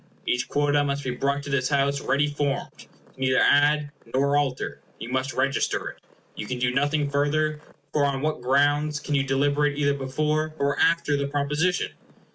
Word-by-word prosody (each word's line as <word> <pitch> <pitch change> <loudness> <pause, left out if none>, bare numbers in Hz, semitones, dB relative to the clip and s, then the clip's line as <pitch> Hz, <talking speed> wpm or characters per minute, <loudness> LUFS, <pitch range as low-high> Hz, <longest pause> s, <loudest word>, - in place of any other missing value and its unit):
Each 125 0 0
quota 145 0 +2
must 140 0 -2
be 130 - -2
brought 140 +3 -1
to 140 - -6
this 130 -2 +1
House 140 -1 +1
ready 140 +3 +2
formed; 145 -1 -2
you - - -16 0.2
can - - -27
neither 130 -1 +2
add 145 0 +3 0.2
nor 140 +3 +2
alter. 140 -3 -1 0.2
You 115 - -7
must 130 +1 -1
register 135 +1 0
it. - - -12 0.4
You 105 - -6
can 125 - -3
do 125 0 0
nothing 145 +2 +1
further, 150 +2 0 0.3
for 150 - +2
on 140 -1 -1
what 155 -4 -1
grounds 145 +3 +2
can 150 - -4
you 140 - +3
deliberate 145 +2 +1
either 145 -1 +2
before 150 +3 -1
or 140 -1 0
after 165 -3 +3
the 140 0 -1
proposition? 150 +5 0
140 Hz, 185 wpm, -25 LUFS, 135-145 Hz, 0.4 s, add